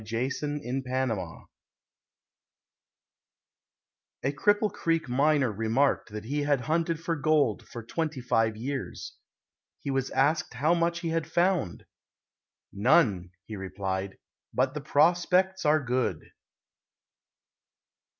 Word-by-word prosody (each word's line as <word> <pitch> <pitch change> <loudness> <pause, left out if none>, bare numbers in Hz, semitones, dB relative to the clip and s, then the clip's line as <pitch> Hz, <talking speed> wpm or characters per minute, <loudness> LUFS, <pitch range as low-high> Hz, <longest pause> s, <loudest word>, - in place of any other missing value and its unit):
A - - -11
HOPEFUL 135 +6 -2 0.2
BROTHER 125 -9 -3 2.8
A 135 - +1
Cripple 205 +6 +2
Creek 165 -5 0
miner 140 0 +2
remarked 115 +8 +1
that 105 0 -7
he 145 +5 -1
had 145 -3 +1
hunted 165 +3 0
for 165 0 -2
gold 145 -6 +1
for 120 - -8
twenty 155 +4 -3
five 115 -3 +1
years. 135 +4 -5 0.6
He 140 - -4
was 135 -1 -1
asked 145 +4 +1
how 155 +5 +2
much 170 0 0
he 170 - -2
had 165 -1 -2
found. 175 - +1 0.9
"None," 100 - +3 0.2
he 110 - -7
replied, 95 0 -4 0.3
"but 130 +1 +1
the 150 - -4
prospects 175 +5 +2
are 150 +1 +4
good." 120 -9 -2
140 Hz, 110 wpm, -28 LUFS, 115-165 Hz, 2.8 s, are